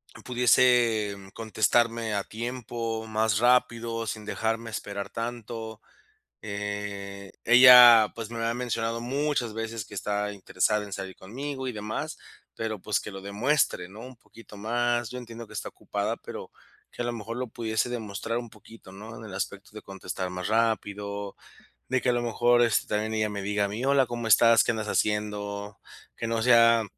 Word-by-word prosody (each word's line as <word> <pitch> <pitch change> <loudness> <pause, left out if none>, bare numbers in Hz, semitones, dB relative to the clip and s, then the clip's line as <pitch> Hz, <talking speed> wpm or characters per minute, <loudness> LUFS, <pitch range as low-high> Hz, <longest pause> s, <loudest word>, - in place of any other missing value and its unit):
mm, - - -12
pudiese, 120 -4 +3
mm, 95 -1 -13
contestarme 115 +1 +1
a 100 -1 0
tiempo, 115 0 -4
más 110 -1 +1
rápido, 115 -2 +2
sin 105 0 -5
dejarme 115 +1 -2
esperar 100 -2 -5
tanto, 115 -1 -6 0.6
eh, 100 -1 -5
ella, 120 -2 +9
pues, 115 -1 -6
me 115 -1 -4
ha 115 0 0
mencionado, 115 -2 -2
muchas 135 -1 -1
veces, 115 -1 -4
que 105 - -13
está 105 +1 -2
interesada 105 +2 0
en 100 - -11
salir 95 -1 -6
conmigo 130 +6 -5
y - - -3
demás, 105 0 -5 0.4
pero 110 -1 -3
pues, 105 +1 0
que - - -7
lo 95 -1 -8
demuestre, 105 0 0
¿no?, 100 +4 -12
un 125 +2 -10
poquito 115 -2 -15
más. 120 +2 0
Yo 125 - -6
entiendo 115 -1 -9
que 105 - -16
está 105 - -4
ocupada, - - -3
pero - - -9 0.4
que - - -4
a - - -4
lo 120 - -1
mejor, 115 0 -6
lo 125 +1 -2
pudiese 110 0 -1
demostrar 115 -1 -3
un 120 -2 -7
poquito, 105 -2 -15
¿no?, 110 +4 -10
en 110 - -10
el 105 -3 -9
aspecto 95 -3 -5
de - - -9
contestar 95 -1 -5
más 90 +1 -4
rápido, 105 -3 -1 0.5
de 130 -1 +1
que, - - +1
a - - +3
lo 120 - 0
mejor, 120 +1 +3
este, 115 -3 +2
también 110 +1 -1
ella 110 -1 0
me 100 -1 -4
diga 100 +1 0
a - - -1
mí: 105 +5 -5
"Hola, 135 -1 +4
¿Cómo 120 -1 -4
estás? 115 0 +6
¿Qué - - +1
andas 110 -1 -4
haciendo?". 105 -1 -2 0.4
Que - - -5
no 115 0 -1
sea 115 -1 +6
110 Hz, 180 wpm, -27 LUFS, 105-120 Hz, 0.6 s, ella